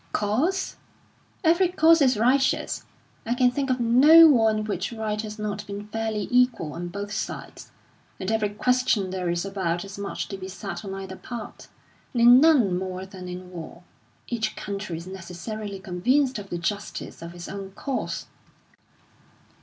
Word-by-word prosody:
"Cause? 275 - 0 0.7
Every 340 +3 +4
cause 330 -2 +5
is 260 -4 +4
righteous. 260 +5 +1 0.4
I 235 +2 -1
can 250 -1 +4
think 275 +1 -2
of 255 0 +1
no 285 +8 +8
war 230 -7 +5
in 215 0 0
which 215 +2 -3
right 215 -2 -2
has 215 0 -7
not 210 -1 -4
been 205 +1 -7
fairly 220 -2 -2
equal 245 - +2
on 175 +1 -5
both 200 +3 -6
sides; 210 - -5 0.5
in 190 +2 -3
every 220 -2 +1
question 215 -3 +1
there 185 -2 -2
is 170 +2 -1
about 190 -3 -2
as 195 +1 -9
much 200 - -4
to 195 - -5
be 190 0 -7
said 195 -2 -6
on 195 -1 -5
either 190 -1 -7
part, 235 -3 -8 0.5
and 240 - +1
in 245 +2 +9
none 250 - +4
more 185 0 -5
than 190 -1 -10
in 180 0 -8
war. 170 0 -9 0.4
Each 220 -2 -2
country 200 -4 -5
is 170 - -8
necessarily 190 +3 -6
convinced 250 +8 +1
of 200 -1 -9
the 175 - -3
justice 200 +4 -4
of 170 +1 -8
its 175 -1 -8
own 195 -1 -6
cause." 265 +6 -3
210 Hz, 170 wpm, -25 LUFS, 190-245 Hz, 0.7 s, in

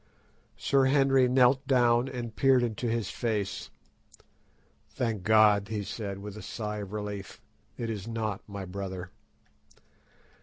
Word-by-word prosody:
Sir 135 +5 +2
Henry 135 -1 +4
knelt 130 +2 +4
down 120 -1 +3
and 120 -4 -6
peered 135 -2 +4
into 120 +1 -2
his 115 -3 -1
face. 110 -5 -2 1.2
"Thank 115 -5 -2
God," 105 -1 +5
he 105 0 -3
said, 100 -1 -5
with 100 0 -8
a 105 - -8
sigh 105 -2 -5
of 100 -2 -6
relief, 105 -2 -6 0.4
"it 115 - -3
is 105 -2 -4
not 110 -3 -3
my 100 -1 -6
brother." 95 -1 -6
110 Hz, 130 wpm, -29 LUFS, 100-125 Hz, 1.2 s, God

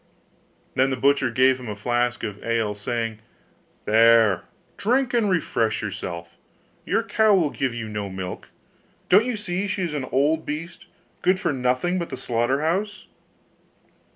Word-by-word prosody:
Then 130 +1 +2
the 130 - -2
butcher 140 0 +3
gave 130 +2 +3
him 125 -3 -7
a 105 - -4
flask 120 +3 -1
of 105 -2 -5
ale, 115 -2 0
saying, 115 +1 -3 0.7
'There, 115 -2 +5 0.3
drink 250 +4 +1
and 230 -4 +2
refresh 115 - 0
yourself; 85 -4 -5 0.6
your - - +1
cow 220 -2 +3
will 165 -6 +2
give 130 -3 -2
you 115 -2 -4
no 105 -2 -4
milk: 95 -1 -6 0.6
don't 200 +5 +6
you 245 -3 -2
see 200 -1 -3
she 190 -1 -2
is 170 -4 -2
an 140 -3 -2
old 145 +5 +1
beast, 155 +4 -6 0.3
good 185 +1 +2
for - - 0
nothing 130 +8 0
but 170 - -4
the 130 - -5
slaughter 120 +4 0
house? 195 +6 -1
130 Hz, 155 wpm, -24 LUFS, 115-175 Hz, 0.7 s, don't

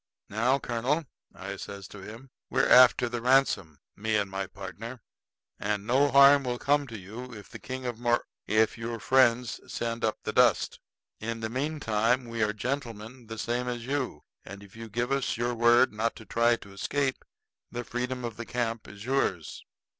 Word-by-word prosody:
"Now, 120 +6 +2
colonel," 130 +5 -1 0.3
I 100 +1 -6
says 100 0 -8
to 105 - -10
him, 115 +7 -11 0.2
"we're 135 +2 +2
after 125 -1 +7
the 120 0 -4
ransom, 125 - +2 0.2
me 110 +2 -1
and 100 -2 0
my 95 0 -3
partner; 105 +6 -8 0.6
and 105 0 -2
no 135 +5 +3
harm 140 0 +7
will 125 -1 -2
come 145 +2 +1
to 115 -3 -7
you 110 +7 -9
if 105 - -11
the - - -9
King 130 0 -6
of 120 -2 -3
Mor 120 0 +1 0.2
if 110 +1 +2
your 115 0 -4
friends 125 -2 +3
send 115 0 -3
up 110 -1 +1
the 110 - -3
dust. 120 -6 +3 0.4
In 115 +1 -4
the 110 - -2
meantime 125 -3 0
we 115 -1 -4
are 105 0 +2
gentlemen 120 0 -5
the 110 0 -7
same 120 +2 -2
as 120 -1 -3
you. 135 0 -2 0.2
And 100 +2 -10
if 100 +1 -16
you 115 0 -8
give 120 +4 -2
us 135 -4 0
your 120 +1 0
word 120 0 +5
not 115 +2 -1
to 110 - -12
try 115 +1 +3
to 100 -4 -13
escape, 135 +6 -1 0.5
the 120 - -5
freedom 125 +1 -3
of 115 -2 -6
the 115 - -5
camp 115 -2 -2
is 100 +2 -10
yours." 125 - -1
115 Hz, 185 wpm, -28 LUFS, 110-125 Hz, 0.6 s, after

